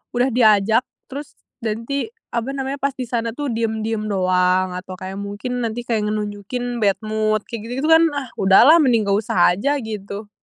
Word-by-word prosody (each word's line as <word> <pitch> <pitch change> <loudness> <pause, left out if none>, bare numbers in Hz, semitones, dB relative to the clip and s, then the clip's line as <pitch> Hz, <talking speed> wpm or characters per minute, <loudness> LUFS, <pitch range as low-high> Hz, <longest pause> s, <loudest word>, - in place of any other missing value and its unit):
udah 245 +2 +2
diajak, 220 -1 +4 0.3
terus 285 +1 -7 0.2
nanti 230 - -3 0.2
apa 240 +3 -2
namanya 270 +1 -3
pas 280 0 -1
di 260 - -4
sana 230 -1 -2
tuh 290 -2 -3
diam-diam 220 -1 -2
doang 185 -1 +2
atau 180 +1 -7
kayak 190 +1 -7
mungkin 205 +5 -4
nanti 230 +1 -3
kayak 220 -3 -1
ngenunjukin 210 +4 -3
bad 200 -3 +3
mood 215 0 0
kayak 230 -2 -7
gitu-gitu 265 +6 -2
kan. 325 +1 +7
Ah 275 -2 -3
udahlah, 235 - +7
mending 245 -7 +3
nggak 200 +1 +3
usah 185 -5 +3
aja 280 +10 0
gitu. 210 -1 -6
220 Hz, 175 wpm, -21 LUFS, 205-250 Hz, 0.3 s, kan